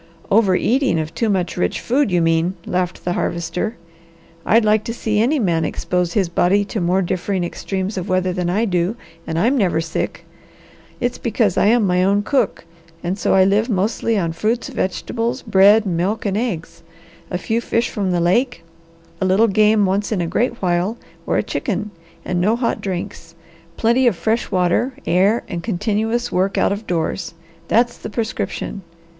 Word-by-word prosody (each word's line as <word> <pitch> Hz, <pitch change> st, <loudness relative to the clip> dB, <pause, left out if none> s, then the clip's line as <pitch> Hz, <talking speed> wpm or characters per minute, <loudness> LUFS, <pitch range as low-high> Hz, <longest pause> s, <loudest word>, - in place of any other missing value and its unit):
"Over 200 Hz, -3 st, +4 dB
eating 255 Hz, -, +2 dB
of 155 Hz, 0 st, -4 dB
too 230 Hz, -, 0 dB
much 185 Hz, -4 st, -1 dB
rich 90 Hz, -, 0 dB
food, 265 Hz, +1 st, +1 dB
you 175 Hz, -2 st, +2 dB
mean," 165 Hz, +3 st, +1 dB
laughed 180 Hz, 0 st, -2 dB
the 175 Hz, -, 0 dB
Harvester. 170 Hz, +8 st, -2 dB, 0.7 s
"I'd 225 Hz, +1 st, +4 dB
like 215 Hz, 0 st, +3 dB
to 230 Hz, -1 st, -4 dB
see 215 Hz, -3 st, -1 dB
any 255 Hz, +8 st, +2 dB
man 170 Hz, -, +1 dB
expose 180 Hz, +2 st, -1 dB
his 195 Hz, -4 st, +2 dB
body 185 Hz, +4 st, +2 dB
to 215 Hz, -, -1 dB
more 180 Hz, +3 st, +2 dB
differing 185 Hz, +1 st, -1 dB
extremes 190 Hz, +3 st, -3 dB
of 185 Hz, +3 st, -6 dB
weather 185 Hz, 0 st, +1 dB
than 175 Hz, -1 st, -1 dB
I 210 Hz, +6 st, +1 dB
do, 180 Hz, +1 st, 0 dB, 0.3 s
and 160 Hz, -, -2 dB
I'm 235 Hz, +11 st, +2 dB
never 180 Hz, -, +2 dB
sick. 165 Hz, 0 st, -4 dB, 0.7 s
It's 245 Hz, -1 st, -2 dB
because 215 Hz, -4 st, +1 dB
I -, -, +3 dB
am 230 Hz, 0 st, +4 dB
my 180 Hz, -1 st, +2 dB
own 200 Hz, +2 st, +2 dB
cook 270 Hz, -7 st, 0 dB, 0.4 s
and 180 Hz, +2 st, -1 dB
so 200 Hz, -, +1 dB
I 190 Hz, -, +6 dB
live 205 Hz, +5 st, +2 dB
mostly 220 Hz, +2 st, 0 dB
on 170 Hz, -4 st, 0 dB
fruits, 220 Hz, +8 st, -1 dB
vegetables, 230 Hz, +6 st, -2 dB
bread, 205 Hz, +3 st, +5 dB
milk, 190 Hz, +5 st, -1 dB
and 200 Hz, -1 st, 0 dB
eggs, 170 Hz, -8 st, -3 dB, 0.5 s
a 180 Hz, -, -2 dB
few 225 Hz, +5 st, -1 dB
fish 235 Hz, 0 st, 0 dB
from 200 Hz, -3 st, -2 dB
the 175 Hz, -1 st, +1 dB
lake, 185 Hz, +3 st, +1 dB, 0.6 s
a -, -, +2 dB
little 195 Hz, +5 st, +4 dB
game 210 Hz, 0 st, +4 dB
once 195 Hz, +3 st, 0 dB
in 210 Hz, -, 0 dB
a 170 Hz, -, 0 dB
great 235 Hz, +6 st, -1 dB
while 180 Hz, +5 st, 0 dB, 0.3 s
or -, -, +1 dB
a -, -, +1 dB
chicken, 210 Hz, -, -3 dB, 0.3 s
and 180 Hz, -1 st, -1 dB
no 210 Hz, +5 st, +3 dB
hot 235 Hz, -1 st, -1 dB
drinks; 180 Hz, -3 st, -5 dB, 0.4 s
plenty 240 Hz, +3 st, +3 dB
of 230 Hz, -, +3 dB
fresh 225 Hz, +6 st, -1 dB
water, 185 Hz, +9 st, +1 dB
air, 195 Hz, +6 st, +2 dB
and 175 Hz, -2 st, -4 dB
continuous 220 Hz, +4 st, -1 dB
work 190 Hz, +2 st, 0 dB
out -, -, +2 dB
of 205 Hz, +2 st, -4 dB
doors. 170 Hz, 0 st, -2 dB, 0.3 s
That's 240 Hz, +1 st, +2 dB
the -, -, -6 dB
prescription! 220 Hz, -2 st, -3 dB
195 Hz, 180 wpm, -20 LUFS, 180-225 Hz, 0.7 s, I